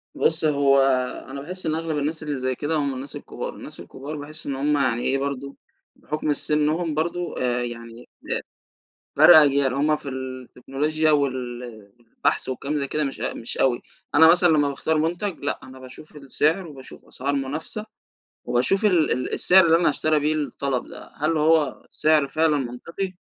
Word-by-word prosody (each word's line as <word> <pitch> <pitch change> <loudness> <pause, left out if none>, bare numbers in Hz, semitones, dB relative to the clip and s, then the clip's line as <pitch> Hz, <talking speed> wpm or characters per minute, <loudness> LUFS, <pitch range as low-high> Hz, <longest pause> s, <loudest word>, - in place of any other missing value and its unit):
بُص 160 0 +1
هو 140 -2 +4 0.5
أنا 140 +1 -7
باحس 180 +4 -4
إن 155 - 0
أغلب 160 -1 -3
الناس 155 +2 -2
اللي 145 -2 -3
زي 130 0 -2
كده 150 +5 -2
هم 140 -3 0
الناس 135 +2 -7
الكبار، - - -6
الناس - - -10
الكبار 145 +3 -8
باحس 155 +2 -7
إن 140 - -3
هم 145 +2 +1
يعني 125 -3 +1
إيه 135 - +1
برضه، 140 0 -4 0.4
بحكم 150 0 -4
ال 145 - +2
سِنهم 155 +2 +1
برضه 170 +3 -2
آآ 125 -1 0
يعني 115 0 -8
ب - - -17 0.9
فرْق 175 - +9
أجيال 140 -3 +4
هم 150 +2 +2
في 140 - -9
التكنولوجيا 135 +4 -2
وال 130 -4 -1 0.5
والبحث - - 0
وكلام 140 +3 -3
زي 140 - -1
كده 150 -1 -1
مش 135 - -5
أ - - -2
مش 115 - -5
أوي، 125 -2 +2 0.3
أنا 160 +2 +8
مثلًا 175 +1 +5
لمّا 150 -3 +3
باختار 155 +3 -1
مُنتَج 175 +4 -2
لأ، 140 - -3
أنا 130 0 -12
باشوف 130 +4 -13
السعر 150 +6 0
وباشوف 135 -5 -12
أسعار 140 +2 -3
منافسة، 150 +10 -4 0.6
وباشوف 160 - +1
ال 175 -6 +3
ال 125 +1 -2
السعر 190 0 +5
اللي 165 0 +5
أنا 170 - +3
هاشتري 155 +1 +1
بيه 155 +1 +1
الطلب 140 -3 -2
ده، - - -12
هل 155 +2 0
هو 155 -3 +2
سعر 155 -2 +2
فعلًا 155 +1 +2
منطقي؟ 155 +9 -5
145 Hz, 180 wpm, -23 LUFS, 135-155 Hz, 0.9 s, فرْق